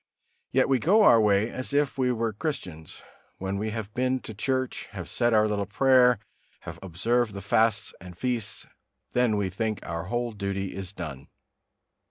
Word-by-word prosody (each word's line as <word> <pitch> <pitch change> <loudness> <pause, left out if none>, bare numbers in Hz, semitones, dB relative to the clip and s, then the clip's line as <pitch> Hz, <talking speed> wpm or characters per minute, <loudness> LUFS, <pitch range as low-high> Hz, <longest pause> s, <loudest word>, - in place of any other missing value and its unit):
Yet - - +3
we 135 -2 +3
go 210 - +4
our 115 - +7
way 105 +1 +3
as 130 +2 -4
if 145 -2 +2
we 130 -2 +1
were 115 -2 -1
Christians; 95 - -5 0.3
when 95 +1 -3
we 110 +1 -2
have 110 -1 -5
been 130 +1 0
to 110 - -8
church, 130 +4 -2
have 90 -4 -6
said 120 -1 +1
our 110 -1 +4
little 100 -2 -1
prayer, 125 +2 +5 0.4
have - - -8
observed 110 +6 0
the - - -4
fasts 110 -2 +2
and 90 -2 -11
feasts, 120 -1 -2 0.5
then 120 -4 +2
we 100 -2 0
think 110 +1 -2
our 85 0 -4
whole 120 +4 -2
duty 100 -2 -3
is 95 -1 -5
done. 75 -9 -7
110 Hz, 175 wpm, -27 LUFS, 100-125 Hz, 0.5 s, our